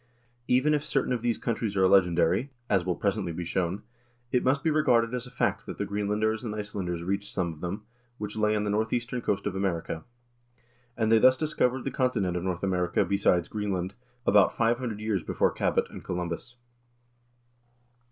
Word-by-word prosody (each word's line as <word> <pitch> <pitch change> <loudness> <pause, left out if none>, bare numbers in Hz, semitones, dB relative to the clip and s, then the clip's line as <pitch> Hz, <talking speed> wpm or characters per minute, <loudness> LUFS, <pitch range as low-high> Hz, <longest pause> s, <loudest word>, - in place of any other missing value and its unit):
Even 130 +5 +3
if 150 -1 +1
certain 135 -3 0
of 120 - -2
these 120 -1 0
countries 110 -4 -2
are 95 0 +5
legendary, 90 +5 +3 0.2
as 95 -3 +3
will 90 0 -1
presently 95 -3 -1
be 85 +1 -4
shown, 90 +2 -1 0.5
it 125 - +2
must 135 +2 +2
be 160 - +2
re 155 0 +3
garded 115 -3 +3
as 125 0 -3
a - - -10
fact 125 - -1
that - - -6
the - - -1
Greenlanders 105 +3 -1
and 110 -3 -4
Icelanders 95 -5 -4
reached 100 +3 -2
some 85 -3 -1
of 75 - -15
them, 95 +5 -4 0.3
which 105 0 -5
lay 105 0 +2
on 105 - 0
the 105 - -1
northeastern 120 +4 -1
coast 100 -3 -1
of 100 -2 -2
America; 85 -4 -2 0.9
and 110 -1 +1
they 115 - +7
thus 130 +3 +6
discovered 130 -4 0
the 135 - -2
continent 100 -9 0
of 90 - -1
North 90 -1 -2
America 90 -2 +1
besides 95 -4 +2
Greenland, 100 -3 -2 0.3
about 100 -1 +4
five 115 +1 +2
hundred 115 -5 -4
years 105 -3 -1
before - - +1
Cabot - - 0
(and - - -9
Columbus)." 90 +7 -4
105 Hz, 190 wpm, -28 LUFS, 90-120 Hz, 0.9 s, they